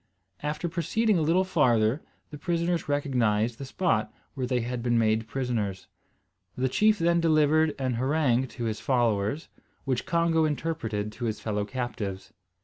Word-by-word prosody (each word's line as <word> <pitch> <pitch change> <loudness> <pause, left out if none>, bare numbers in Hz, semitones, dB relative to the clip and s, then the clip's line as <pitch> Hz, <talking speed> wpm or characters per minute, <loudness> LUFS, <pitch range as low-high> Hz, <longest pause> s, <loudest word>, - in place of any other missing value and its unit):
After 150 +3 -2
proceeding 185 +4 +1
a - - 0
little 165 +5 +3
farther 125 -7 +2 0.3
the 150 - -7
prisoners 170 -1 -1
recognised 120 -6 +1
the 135 - -5
spot 130 - 0 0.2
where 130 -3 -3
they 125 -1 0
had 120 +1 -3
been 120 0 +1
made 110 0 +2
prisoners. 110 -7 -2 0.7
The 130 +1 +1
chief 215 +9 +3
then 170 -1 +2
delivered 155 -1 +3
an 130 -2 -1
harangue 130 -3 +2
to 120 - -3
his 110 -2 -2
followers, 120 +1 0 0.4
which 130 -3 -1
Congo 165 -1 +2
interpreted 140 -9 -2
to 115 +3 -5
his 110 -1 -2
fellow 105 -2 -2
captives. 105 -5 -5
130 Hz, 150 wpm, -27 LUFS, 115-160 Hz, 0.7 s, little